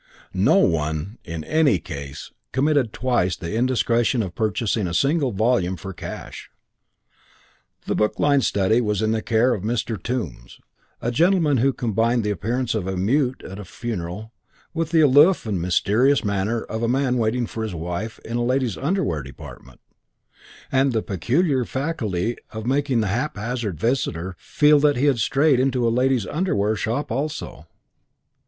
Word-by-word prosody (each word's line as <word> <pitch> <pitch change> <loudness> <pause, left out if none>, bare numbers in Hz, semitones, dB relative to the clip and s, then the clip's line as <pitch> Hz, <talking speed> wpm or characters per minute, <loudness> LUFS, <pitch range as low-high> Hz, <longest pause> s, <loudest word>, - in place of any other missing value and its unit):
No - - +3
one, 80 +6 0
in 85 -3 -6
any 150 - +3
case, 70 -3 -8 0.2
committed 140 -3 +2
twice 115 -10 0
the 85 +3 -6
indiscretion 120 -1 +1
of 90 -3 -6
purchasing 110 0 -1
a 85 - -3
single 140 - +2
volume 105 -3 +1
for 95 +4 -7
cash. - - -8 1.4
The - - -1
book 105 - 0
lined 145 -2 +3
study 105 +4 +2
was 105 -2 0
in 110 - +1
the 110 0 0
care 115 +3 +2
of 100 -5 -4
a - - -2
Mr. 115 -4 -2
Tombs, 85 - -5 0.4
a 120 - 0
gentleman 165 0 +3
who 135 +4 +3
combined 115 -1 0
the 105 - 0
appearance 115 +6 -1
of 105 -5 -2
a 95 -1 -2
mute 125 +7 0
at 95 +2 -8
a - - -6
funeral 105 +1 -6 0.4
with 165 -1 -2
the 165 -1 +4
aloof 150 +5 +5
and 100 -6 -2
mysterious 110 +10 +2
manner 100 +3 -1
of 110 +1 -5
a 115 - +1
man 130 0 +1
waiting 115 +2 0
for 110 - -6
his 110 -5 -3
wife 90 +7 -4
in 115 +1 -3
a 120 - 0
ladies' 125 -4 0
underwear 135 - 0
department, 65 -1 -12 0.9
and 135 -1 +2
the 110 - 0
peculiar 130 - +1
faculty 120 - -2
of 110 0 -7
making 135 -2 +1
the 110 - 0
haphazard 115 - -3
visitor 95 -7 -1
feel 150 0 +4
that 145 0 +3
he 135 - +1
had 140 -5 +3
strayed 135 +2 +3
into 130 -2 +1
a 115 - +1
ladies' 125 -3 +2
underwear 110 - 0
shop 115 +8 -2
also. 150 +6 -4
115 Hz, 165 wpm, -22 LUFS, 100-135 Hz, 1.4 s, aloof